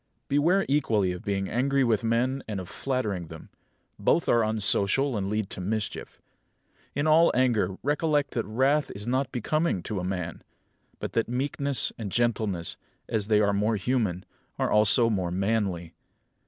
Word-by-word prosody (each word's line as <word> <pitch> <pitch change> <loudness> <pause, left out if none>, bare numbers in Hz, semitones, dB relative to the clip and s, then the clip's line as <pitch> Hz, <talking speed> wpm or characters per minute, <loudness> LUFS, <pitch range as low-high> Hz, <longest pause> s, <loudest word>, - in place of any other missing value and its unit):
Beware 170 +8 +2
equally 110 -10 +1
of 90 +3 -7
being 100 -2 -1
angry 135 +3 +1
with 115 -3 +1
men 125 +4 0
and 105 -3 -3
of 90 - -7
flattering 105 -10 -2
them. 80 0 -11 0.5
Both 170 - +2
are 115 -1 +4
unsocial 110 +4 +2
and 100 -2 -2
lead 105 -1 -2
to - - -4
mischief. 105 +3 -4 0.8
In 145 +2 0
all 160 +2 +5
anger 110 -7 +1
recollect 150 0 +1
that 115 - -1
wrath 135 +7 +1
is 100 +1 -4
not 130 +2 -1
becoming 145 - -1
to 105 - -3
a - - -4
man; 90 -3 -4 0.6
but - - -5
that 115 0 0
meekness 140 +2 +1
and 105 -4 -5
gentleness, 110 -7 0 0.3
as 110 -3 -1
they 105 -1 +4
are 100 -1 +2
more 105 +3 +1
human, 105 -5 -1 0.3
are - - 0
also 110 +3 +4
more 95 -6 -1
manly. 95 -3 -1
110 Hz, 160 wpm, -27 LUFS, 100-130 Hz, 0.8 s, all